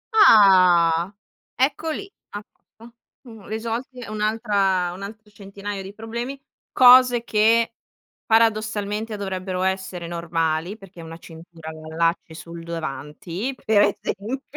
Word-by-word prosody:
Ah! 185 - +5 0.4
Ecco 275 +5 0
lì! 395 +6 -5 0.2
A 205 - -7
posto. 230 +1 -20 0.3
Mhmm, 225 -5 -13
risolti 230 +4 -5
è 240 - -8
un'altra 210 -4 0
un 190 - -10
altro 215 +1 -10
centinaio 200 0 -7
di 190 - -9
problemi, 235 +5 -6 0.3
cose 250 -1 +6
che 230 +1 +2 0.5
paradossalmente 215 -1 0
dovrebbero 185 -1 -4
essere 190 -2 -3
normali, 165 +2 -2
perché 190 -3 -13
una 165 0 -10
cintura 165 -1 -12
la 155 0 -11
allacci 165 0 -1
sul 170 0 -10
davanti, 165 - -5
per 215 -2 +4 0.2
esempio, 240 +8 -4
200 Hz, 120 wpm, -22 LUFS, 170-225 Hz, 0.5 s, cose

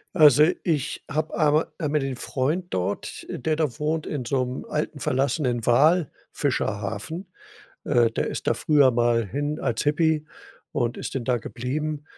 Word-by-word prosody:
Also, 150 -1 +7 0.2
ich 155 -5 -1
habe 155 +2 -2
einma 155 0 +3
einmal 150 -1 +1
den 135 -1 -3
Freund 135 +10 -2
dort, 95 +2 -3
äh, - - -4
der 155 -1 0
da 150 -6 -1
wohnt 155 +1 -1
in 140 -5 -4
so 130 +1 +1
'nem 125 +1 -5
alten, 150 -1 -3
verlassenen 130 -3 0
Walfischerhafen. 150 - 0 0.5
Äh, 120 -4 +3
der - - -1
ist - - -5
da - - +3
früher 145 -4 +4
mal 120 -1 +2
hin 145 +8 -2
als 120 -4 -1
Hippie 155 +1 +2 0.5
und 120 0 -1
ist - - -5
denn 130 - -1
da 125 0 +1
geblieben, 145 +6 -4
140 Hz, 160 wpm, -25 LUFS, 120-155 Hz, 0.5 s, Also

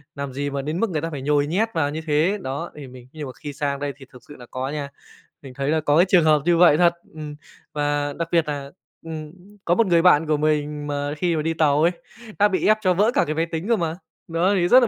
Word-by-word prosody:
làm 140 -2 -5
gì 145 +2 -2
mà 140 0 -3
đến 155 +5 -3
mức 230 -1 +1
người 155 -4 -2
ta 165 - -3
phải 145 -3 -5
nhồi 145 +1 +1
nhét 205 +8 0
vào 145 -3 +1
như 155 +2 -4
thế. 155 +7 +2
Đó, 140 +5 -4
thì 145 -3 -9
mình 125 -1 -13
nhưng 155 -2 -6
mà - - -7
khi 145 -1 -5
sang 140 0 -2
đây 145 -1 -3
thì 135 - -13
thực 125 - -14
sự 145 - -11
là 125 - -12
có 130 +1 -3
nha. 145 -1 -4 0.5
Mình 135 -3 -11
thấy 140 +1 -2
là 160 0 +1
có 145 0 +2
cái 175 - +6
trường 175 -4 +5
hợp 155 -2 +4
như 175 -1 +3
vậy 165 -3 +6
thật, 175 -1 +4 0.2
ừm. 150 -1 -7 0.4
Và 145 -1 -1
đặc 170 +2 -3
biệt 165 -2 +2
là, 140 -2 -5 0.3
ừm, 155 -2 -6 0.3
có 175 - +3
một 230 +1 +3
người 170 -2 +4
bạn 160 -3 +5
của 155 - +2
mình 150 -1 -1
mà 145 0 -2
khi 175 -1 0
mà 155 - 0
đi 165 +1 -1
tàu 150 -2 +2
ấy, 170 +2 +4 0.5
đã 205 - +6
bị 190 -2 -1
ép 215 0 +5
cho 185 -3 +3
vỡ 205 +6 +3
cả 285 - +3
cái 155 - -3
máy 165 +1 +1
tính 165 +5 -3
cơ 235 - +5
mà. 165 -2 -2 0.3
Đó 170 +4 +1
thì 175 -2 +2
rất 255 - +8
là - - +3
155 Hz, 280 wpm, -22 LUFS, 145-170 Hz, 0.5 s, rất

